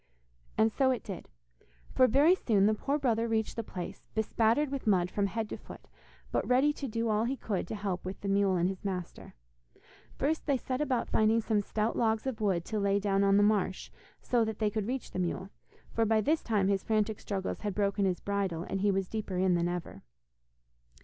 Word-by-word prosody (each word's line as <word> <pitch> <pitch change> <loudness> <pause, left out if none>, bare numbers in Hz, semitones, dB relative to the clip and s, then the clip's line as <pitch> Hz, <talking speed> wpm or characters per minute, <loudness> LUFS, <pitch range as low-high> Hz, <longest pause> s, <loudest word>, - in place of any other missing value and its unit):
And 220 0 +3
so 270 -1 +3
it 255 -3 0
did, 195 -4 -7 0.6
for 255 - +5
very 285 +9 +5
soon 215 - +2
the 215 - +4
poor 280 +7 -1
brother 235 -5 +1
reached 220 -1 -1
the 230 - -2
place, 180 -5 -7
bespattered 225 +5 +2
with 275 -4 -4
mud 180 -3 +3
from 200 -1 0
head 220 +2 -3
to - - -5
foot, - - -13 0.4
but - - 0
ready 265 +4 +4
to 280 - -5
do 230 0 -2
all 215 +1 +1
he 265 +3 -2
could 200 -7 -3
to 220 - -4
help 195 -3 -3
with 185 +1 -6
the 200 - -4
mule 195 -1 +3
and 175 0 +2
his 190 +1 -5
master. 185 -3 -5 0.8
First 310 +4 -1
they 280 -2 +3
set 255 +2 -3
about 260 -5 0
finding 220 +1 +3
some 215 -2 +1
stout 215 +2 -1
logs 220 0 +1
of 250 -4 -3
wood 185 -5 +1
to 215 - -2
lay 200 0 +2
down 200 -1 +1
on 195 0 +4
the 205 - +5
marsh 205 -3 +1 0.3
so 240 -2 +2
that 220 -1 -3
they 210 -1 0
could 215 -2 -2
reach 255 0 -4
the - - -4
mule, 185 +2 -2 0.4
for 230 - +2
by 220 0 +3
this 305 +8 +1
time 205 -4 +1
his 195 -1 +1
frantic 215 -1 0
struggles 195 -2 -4
had 205 -3 -3
broken 200 -1 +1
his 185 -2 0
bridle, 195 -5 -2
and 195 +1 -3
he 205 - +3
was 195 -1 0
deeper 205 -3 -4
in 185 0 +3
than 170 0 +1
ever. 175 - -5
210 Hz, 215 wpm, -30 LUFS, 195-230 Hz, 0.8 s, for